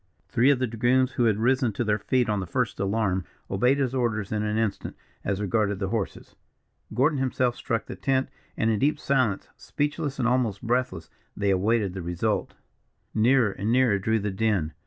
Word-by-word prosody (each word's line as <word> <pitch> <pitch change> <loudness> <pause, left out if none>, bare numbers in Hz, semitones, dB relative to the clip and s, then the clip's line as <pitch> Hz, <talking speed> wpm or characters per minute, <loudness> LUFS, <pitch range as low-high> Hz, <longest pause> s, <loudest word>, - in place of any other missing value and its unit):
Three 125 +3 +3
of 140 - +4
the 130 - 0
dragoons, 125 +3 +2
who 120 -1 +1
had 110 -3 +3
risen 125 0 +2
to 120 - -1
their 105 -1 +1
feet 125 +3 +1
on 105 -2 0
the 95 - -4
first - - -1
alarm, 100 -2 0 0.3
obeyed 125 +8 +3
his 135 -3 0
orders 115 -6 -1
in 105 -1 0
an 105 0 -1
instant, 110 -3 -2 0.3
as 100 0 -1
regarded 105 0 0
the 95 -1 -2
horses; 110 -2 -4 0.6
Gordon 140 +3 +2
himself 125 -2 0
struck 115 -2 -2
the - - -7
tent, 135 -1 0 0.3
and 115 - +2
in 110 - 0
deep 145 +6 +2
silence, 130 -8 0
speechless 145 -1 -3
and 125 -3 +1
almost 120 -4 0
breathless, 120 -9 -1 0.3
they 100 -1 +1
awaited 100 +1 +1
the 95 - -5
result. 85 0 -2 0.6
Nearer 115 0 +3
and 100 +3 -2
nearer 120 -5 +3
drew 110 +3 +1
the 105 -1 -2
din. 95 -6 0
115 Hz, 190 wpm, -26 LUFS, 100-130 Hz, 0.6 s, of